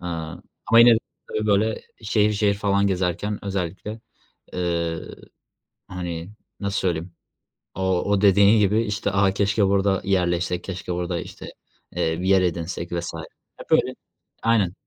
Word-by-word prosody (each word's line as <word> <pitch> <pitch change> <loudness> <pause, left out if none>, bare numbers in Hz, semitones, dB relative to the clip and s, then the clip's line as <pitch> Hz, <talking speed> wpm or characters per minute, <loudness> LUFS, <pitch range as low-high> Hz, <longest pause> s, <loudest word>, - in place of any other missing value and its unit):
Aaa, 85 -3 -5 0.3
ama 115 - +5
yine 115 0 +9
de - - +2 0.3
tabii, 110 0 -2
böyle, 105 +2 +1 0.2
şehir 105 -1 +2
şehir 105 -1 +2
falan 100 0 +1
gezerken 95 +2 -1
özellikle, 100 +3 -4 0.5
eee, 85 -2 -1 0.9
hani, 90 -1 -5 0.3
nasıl 100 0 -1
söyleyeyim 85 -1 -2 0.6
o 95 -1 0
o 100 -1 +1
dediğin 100 +2 +6
gibi, 105 +3 +3
işte, 105 -1 -2
"A! 100 0 +3
Keşke 100 +1 +2
burada 95 0 +2
yerleşsek, 90 -2 0
keşke 90 -2 -5
burada, 85 0 -2
işte, - - -9 0.5
eee, 80 -2 0
bir 95 - -1
yer 95 -1 +5
edinsek." 85 0 -3
vs. 85 -1 -2 0.5
Hep - - -10
öyle - - +3 0.5
Aynen. 110 -6 +2
95 Hz, 140 wpm, -23 LUFS, 90-100 Hz, 0.9 s, yine